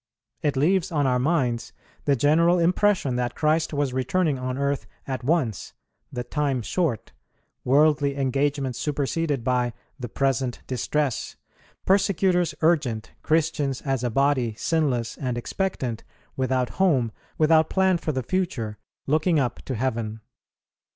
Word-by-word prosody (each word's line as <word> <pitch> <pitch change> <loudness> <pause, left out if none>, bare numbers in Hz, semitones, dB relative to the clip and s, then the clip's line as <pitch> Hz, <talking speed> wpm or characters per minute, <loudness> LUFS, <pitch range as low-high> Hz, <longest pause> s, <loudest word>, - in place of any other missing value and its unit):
It 145 -2 0
leaves 180 +5 +2
on 145 -3 +1
our 125 -1 +2
minds 125 -5 0 0.3
the 140 - +3
general 165 +7 +4
impression 175 -5 +2
that 120 -1 -2
Christ 155 +1 +1
was 145 -3 -1
returning 140 +3 0
on 130 0 -3
earth 140 0 -1 0.2
at 130 -2 -4
once, 135 - 0 0.4
"the 125 - -4
time 135 -1 -1
short," 135 - -1 0.5
worldly 145 +1 +3
engagements 135 -1 0
superseded 145 -1 -1
by 125 -1 +1 0.3
"the 120 -2 -5
present 130 -1 -1
distress," 135 +1 -2 0.5
persecutors 185 -4 +2
urgent, 145 -10 +1
Christians, 155 -4 0
as 135 -3 -1
a 125 - +1
body, 130 -2 +1
sinless 130 -5 0
and 125 -3 -2
expectant, 125 - -3 0.3
without 130 -2 0
home, 135 -12 +3 0.3
without 160 0 +4
plan 190 -2 +2
for 155 - -2
the 130 -3 -2
future, 120 - -2 0.3
looking 155 +3 +2
up 125 -3 -1
to 130 - -3
heaven. 110 -2 -2
140 Hz, 130 wpm, -25 LUFS, 125-160 Hz, 0.5 s, general